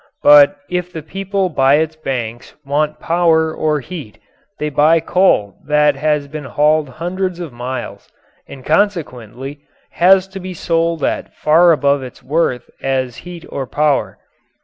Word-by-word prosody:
But 145 +4 +7
if 180 0 -3
the 160 -3 -7
people 195 +3 -2
by 135 -3 +3
its 160 +1 0
banks 120 -6 -5
want 150 +2 -1
power 165 -2 +2
or 150 -2 -1
heat 140 -8 -9 0.4
they 150 - -2
buy 155 +3 +4
coal 160 - +1
that 150 -1 +3
has 150 0 0
been 150 0 -7
hauled 150 +2 +1
hundreds 175 +5 -4
of 165 -7 -7
miles 125 +2 -6 0.4
and 130 -2 -12
consequently 145 - -2 0.3
has 185 +2 +4
to 195 0 -8
be 185 -1 -7
sold 165 -1 -1
at - - -2
far 170 +3 +4
above 140 -3 +2
its 130 -1 -10
worth 140 -4 -1
as 130 -2 -2
heat 175 -1 -10
or 135 -2 -4
power. 150 0 0
155 Hz, 150 wpm, -17 LUFS, 135-170 Hz, 0.4 s, But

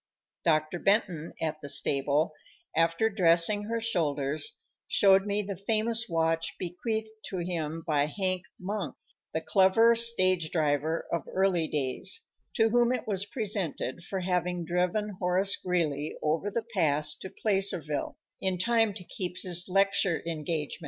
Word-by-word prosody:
Dr. 155 +1 +2
Benton, 185 -6 +1
at 155 -1 -2
the 145 - -6
stable, 140 +3 +1 0.4
after 165 +6 +3
dressing 195 0 +3
her 230 +2 -1
shoulders, 150 -9 -1 0.3
showed 195 0 +5
me 205 +1 0
the 200 0 -4
famous 225 +4 0
watch 165 0 0
bequeathed 220 +5 -3 0.2
to 190 - -4
him 165 -2 -3
by 150 -4 +2
Hank 185 +3 -1 0.2
Monk, 185 -6 -3 0.4
the 160 - -1
clever 190 +7 +5
stage 185 -8 +2
driver 155 0 0
of 170 - -1
early 185 -4 +2
days, 150 - -2 0.3
to 225 -1 +4
whom 240 +1 +3
it 250 -2 -1
was 200 -1 -1
presented 195 - -2
for 190 +1 -3
having 180 -1 -1
driven 180 +4 0
Horace 185 +2 +2
Greeley 155 -5 -1
over 160 +6 +1
the 225 +2 -2
pass 150 -5 +1
to 190 - -7
Placerville, 185 -10 -1 0.2
in 190 -1 +1
time 225 +1 +2
to 195 - -8
keep 180 0 -5
his 180 0 -4
lecture 195 -2 +2
engagement. 155 -2 -3
180 Hz, 140 wpm, -29 LUFS, 160-200 Hz, 0.4 s, showed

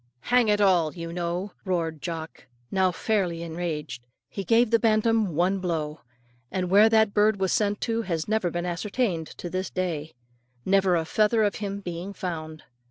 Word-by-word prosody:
"Hang 245 -2 +3
it 210 -1 +3
all, 180 -6 +3
you 165 -1 -6
know," 175 +3 -3
roared 165 -5 -2
Jock, 165 -4 -6 0.2
now 190 -1 +2
fairly 180 -4 -1
enraged. 160 -6 -4 0.3
He 195 - -5
gave 230 +4 +3
the 230 - +5
bantam 220 -4 +2
one 185 +4 +2
blow; 160 -4 -3 0.5
and 185 -1 -2
where 210 +3 +7
that 220 -2 +3
bird 210 -1 +3
was 190 -2 +1
sent 205 -1 +1
to 230 -1 0
has 165 -7 -3
never 215 -4 +1
been 175 +1 -3
ascertained 180 -1 -1
to - - -6
this 185 +2 -3
day, 160 -4 -3 0.5
never 195 -1 +3
a 165 -1 0
feather 215 +5 +2
of 205 - +2
him 200 -1 -4
being 175 +1 -6
found. 160 -4 -5
185 Hz, 170 wpm, -26 LUFS, 170-210 Hz, 0.5 s, where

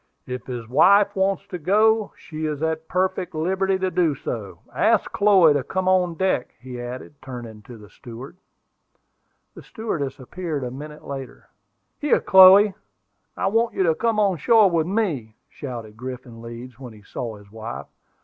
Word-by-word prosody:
"If 125 -1 -6
his 120 -3 -6
wife 200 - +4
wants 195 -1 0
to 180 - -5
go, 215 +5 +2
she 155 -1 -5
is 150 0 -4
at 160 0 -2
perfect 185 -1 -1
liberty 190 +4 0
to 185 0 -1
do 165 -6 +1
so. 105 -6 -6 0.2
Ask - - +2
Chloe 190 -7 +5
to 145 -2 0
come 185 +6 -3
on 180 -2 +2
deck," 185 -7 -1
he 125 -1 -8
added, 125 +4 -7
turning 120 -5 -9
to 120 +1 -12
the 105 -1 -14
steward. 125 - -11 1.2
The - - -12
stewardess 170 - -4
appeared 155 +1 -5
a 125 - -4
minute 150 +3 -10
later. 135 -2 -8 0.5
"Here, 295 - +2
Chloe, 190 +2 +7 0.6
I - - -1
want 225 +4 +1
you 190 - +2
to 165 -3 +3
come 225 +4 0
on 195 -4 +2
shore 215 +2 +4
with 165 -1 +1
me," 165 - -2
shouted 115 -6 -8
Griffin 125 -1 -8
Leeds, 120 +1 -10
when 125 -4 -9
he 105 -1 -16
saw 115 +2 -6
his 100 -1 -17
wife. 115 +2 -7
155 Hz, 170 wpm, -23 LUFS, 125-190 Hz, 1.2 s, Chloe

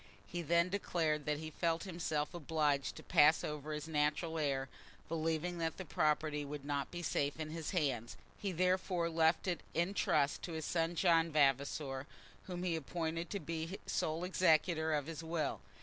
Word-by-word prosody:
He 175 - -4
then 170 +2 +3
declared 160 -6 0
that 150 0 +1
he 155 +1 -6
felt 165 +1 0
himself 165 -4 -2
obliged 150 -4 0
to - - -10
pass 155 +2 +5
over 150 0 -4
his 150 +1 -4
natural 160 +2 0
heir, 135 -3 0 0.4
believing 165 +2 -1
that 165 -1 -1
the 190 - -5
property 150 -1 +1
would 145 0 -6
not 145 -1 -1
be 175 0 -6
safe 145 -2 0
in 155 -1 -4
his 160 -1 -4
hands; 140 - -1 0.2
he 200 - -2
therefore 180 -1 +1
left 160 +2 +3
it 175 -4 0
in 170 +4 +1
trust 145 -7 +2
to 170 - -5
his 160 -1 -3
son 165 0 0
John 165 -1 +4
Vavasor, 140 -1 +1 0.4
whom 180 -1 -4
he 175 -2 +1
appointed 165 +2 -3
to 200 - -2
be 165 +3 -4
sole 160 +2 -1
executor 160 -3 +3
of 150 -2 +1
his 165 0 -6
will. 160 -2 -2
160 Hz, 175 wpm, -36 LUFS, 150-170 Hz, 0.4 s, pass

